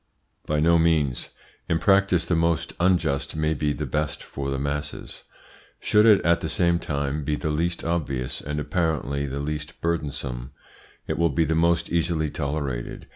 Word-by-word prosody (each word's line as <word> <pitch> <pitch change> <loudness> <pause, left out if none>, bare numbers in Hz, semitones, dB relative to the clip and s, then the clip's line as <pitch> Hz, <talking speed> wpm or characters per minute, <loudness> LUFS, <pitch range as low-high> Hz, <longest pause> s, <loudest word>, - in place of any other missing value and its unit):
By 75 0 +1
no 85 +2 +4
means. 80 -6 +1 0.4
In 80 - +3
practice 95 -1 +3
the 85 - 0
most 85 -1 +1
unjust 85 -7 +1
may 80 0 +1
be 75 0 0
the 75 +1 -3
best 75 +3 -2
for 70 -1 -5
the 70 - -1
masses. 70 +2 -4 0.6
Should 105 +2 +4
it 105 -3 +6
at 85 0 +4
the 80 - -3
same 85 0 +2
time 70 -1 -2
be 75 +1 0
the 75 0 -2
least 85 +3 -1
obvious, 70 -6 -2
and 75 +1 -3
apparently 75 -4 -1
the 70 +1 -4
least 75 +2 -4
burdensome, 70 -6 -3 0.5
it - - -3
will 85 0 +4
be 80 +3 +1
the 80 - 0
most 85 +1 +2
easily 80 -3 0
tolerated. 70 -4 -4
75 Hz, 170 wpm, -25 LUFS, 70-85 Hz, 0.6 s, it